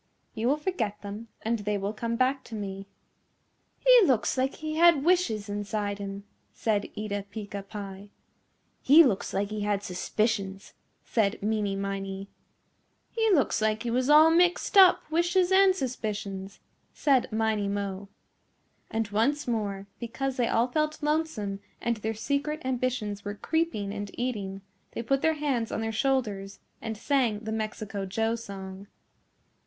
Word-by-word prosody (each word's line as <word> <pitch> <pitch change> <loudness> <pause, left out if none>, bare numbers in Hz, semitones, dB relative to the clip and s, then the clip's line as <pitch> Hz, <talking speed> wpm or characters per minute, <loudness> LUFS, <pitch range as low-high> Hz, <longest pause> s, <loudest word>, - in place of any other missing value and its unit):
You 225 0 -1
will 285 +3 +3
forget 240 - -2
them 205 +3 -7 0.2
and 225 +1 0
they 205 0 -1
will 200 +1 -3
come 230 +2 -2
back 260 +2 +1
to 225 - -8
me." 195 -1 -5 0.9
"He - - +7
looks 230 -6 +2
like 265 +1 0
he 310 0 -5
had 335 -4 +6
wishes 300 - +2
inside 205 0 -3
him," 200 0 -6 0.3
said 210 -2 0
Eeta 205 -1 -3
Peeca 205 -1 -6
Pie. 195 0 -8 0.7
"He 305 +5 +8
looks 210 -10 0
like 200 +1 -1
he 215 -1 -3
had 205 -1 0
suspicions," 195 +1 -2 0.3
said 210 -3 +1
Meeney 210 -2 0
Miney. 195 0 -4 0.8
"He 450 -1 +1
looks 300 - +3
like 220 +1 +1
he 235 - -2
was 255 +3 +1
all 310 +2 +8
mixed 355 +4 +2
up 375 -2 +8
wishes 350 +3 +2
and 380 0 +6
suspicions," 210 - -4 0.4
said 270 -6 +2
Miney 220 -2 0
Mo. 200 -1 -3 0.8
And 225 -1 -1
once 255 +9 +1
more 205 -4 -2
because 260 +3 -3
they 245 -2 +1
all 235 +2 +2
felt 305 +3 -1
lonesome 295 -11 -1 0.2
and 235 -1 -1
their 220 +1 -3
secret 280 +6 -1
ambitions 245 -5 -2
were 205 0 -4
creeping 220 -8 -1
and 205 -1 -5
eating, 205 -6 -3 0.3
they 230 - -4
put 275 +4 +1
their 320 0 +2
hands 270 -7 -1
on - - -2
their 225 0 -1
shoulders 215 -6 -1 0.2
and 220 -1 -4
sang 240 -4 +1
the 220 0 -5
Mexico 215 -2 -4
Joe 225 +4 0
song. 195 -3 -7
220 Hz, 150 wpm, -28 LUFS, 200-270 Hz, 0.9 s, He